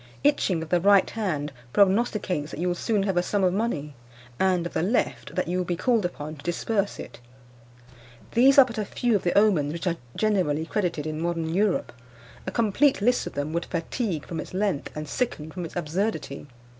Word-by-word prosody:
Itching 195 - +2
of 160 - -10
the 175 -1 +2
right 200 0 +5
hand 155 -10 -2 0.2
prognosticates 195 -5 +2
that - - -7
you 180 - 0
will - - +1
soon 205 +3 0
have 195 -2 -1
a - - +5
sum 200 +2 0
of 180 -1 +3
money; 175 -9 -2 0.5
and, 185 -2 +2
of 170 - -5
the - - 0
left, 205 +9 -1
that 185 - 0
you 180 +2 -1
will - - +1
be 175 0 -2
called 230 +1 +1
upon 155 -3 -5
to 140 - -13
disburse 200 +4 -1
it. - - -9 1.1
These 265 +4 +5
are 275 - +10
but 230 -3 -6
a 210 - -1
few 240 +2 0
of 200 - +1
the 175 - 0
omens 175 -9 +3
which 170 +2 -5
are 170 -2 0 0.2
generally 180 -8 +1
credited 170 -5 -2
in 155 0 -3
modern 165 -1 -1
Europe. 200 -5 +1 0.5
A - - -1
complete 230 +7 +2
list 245 +5 +2
of - - -7
them 145 +2 -3
would 170 0 -1
fatigue 170 - -3
from 165 - -5
its 180 - -7
length, 195 -7 -1
and 150 0 -4
sicken 160 - -2
from 180 0 -5
its 160 - -10
absurdity. 165 -3 -2
180 Hz, 205 wpm, -26 LUFS, 160-210 Hz, 1.1 s, are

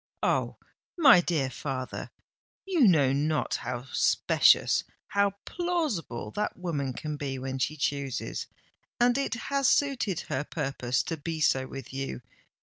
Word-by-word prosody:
"Oh! - - +1 0.4
my 270 - +8
dear 150 -7 -1
father, 130 0 -5 0.6
you 345 - +4
know 145 -7 +4
not 150 +2 0
how 125 +1 -4
specious—how 200 +8 +2
plausible 305 - -2
that 210 - -2
woman 150 -8 -2
can 150 +4 -5
be 135 -2 -3
when 130 0 -4
she 155 +4 -1
chooses; 140 -2 -2 0.5
and 245 0 +4
it 275 -3 -1
has 275 +2 0
suited 255 - +1
her 135 - -3
purpose 130 -4 -2
to 165 - -4
be 160 +1 -4
so 130 -3 +2
with 135 0 -9
you. 135 -2 -4
150 Hz, 135 wpm, -28 LUFS, 135-210 Hz, 0.6 s, my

